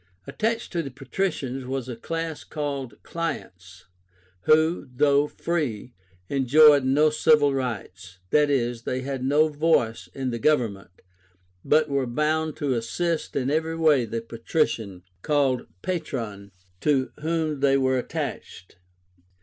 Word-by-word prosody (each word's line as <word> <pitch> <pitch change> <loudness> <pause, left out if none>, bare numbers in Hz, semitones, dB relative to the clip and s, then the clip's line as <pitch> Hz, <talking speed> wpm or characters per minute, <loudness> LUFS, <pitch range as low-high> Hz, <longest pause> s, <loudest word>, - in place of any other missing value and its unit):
Attached 225 +1 -2
to 170 - -1
the 140 - -6
Patricians 135 -1 -3
was 130 0 -4
a 125 - -5
class 165 +5 -4
called 140 -6 -4
CLIENTS, 90 - -6 0.6
who, 160 0 +3
though 145 +2 +3
free, 140 -9 -3 0.3
enjoyed 140 +3 +6
no 145 +4 +3
civil 150 -2 +4
rights, 95 -8 -5 0.2
i. 150 0 +6
e. 130 -4 +1
they 130 +1 -2
had 135 -1 -4
no 145 +4 +4
voice 150 -7 +1
in 130 -2 -2
the 115 - -3
government, 110 - 0 0.6
but 155 0 +3
were 140 -3 0
bound 155 +4 0
to 145 -3 -1
assist 160 +8 -2
in 135 0 0
every 160 +1 0
way 150 -6 +4
the 115 +1 -4
Patrician, 115 - -2 0.2
called 140 -3 +1 0.2
PATRON, 115 - -4 0.3
to 135 0 +1
whom 155 -1 -1
they 135 0 +3
were 130 -1 +2
attached. 95 -6 -6
140 Hz, 130 wpm, -25 LUFS, 120-155 Hz, 0.6 s, enjoyed